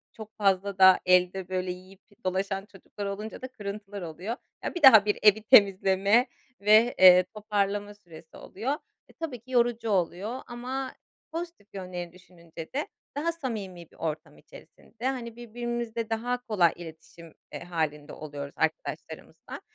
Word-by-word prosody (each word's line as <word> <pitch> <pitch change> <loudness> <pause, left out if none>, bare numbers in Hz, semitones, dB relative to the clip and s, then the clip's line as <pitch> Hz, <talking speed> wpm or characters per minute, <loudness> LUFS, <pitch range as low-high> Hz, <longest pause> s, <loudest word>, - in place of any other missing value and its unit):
çok 220 -1 -10
fazla 195 -1 +1
da 190 -1 +8
elde 180 0 +3
böyle 185 -1 -2
yiyip 185 +1 -12 0.3
dolaşan 195 +1 -1
çocuklar 200 +1 -9
olunca 205 +2 -6
da 255 - -5
kırıntılar 205 -4 -7
oluyor. 175 +7 -5 0.3
Ya, - - -4
bir 350 - -3
daha 225 -7 +9
bir 210 - 0
evi 215 0 +6
temizleme 200 +3 +5 0.3
ve, 215 +4 +5
eee, 185 -1 +9
toparlama 205 -1 -1
süresi 165 -5 -15
oluyor. 225 +8 -4 0.4
Eee, - - -20
tabii 305 -7 -5
ki 250 +4 -17
yorucu 235 -2 +1
oluyor 200 +6 -1
ama 255 +2 -5 0.4
pozitif 335 - -6
yönleri 180 -3 -6
düşününce 170 -3 -12
de 295 - -1 0.3
daha 335 +3 0
samimi 205 - -6
bir - - -21
ortam 155 -1 -5
içerisinde, 240 +2 -13
hani, 240 -4 -4
birbirimizle 240 -1 -4
daha 245 +2 -2
kolay 185 -7 +3
iletişim, 165 0 -12 0.2
eee, - - -6
hâlinde 155 -4 -3
oluyoruz 145 -2 -7
arkadaşlarımızla, 160 0 -4
200 Hz, 145 wpm, -27 LUFS, 180-235 Hz, 0.4 s, daha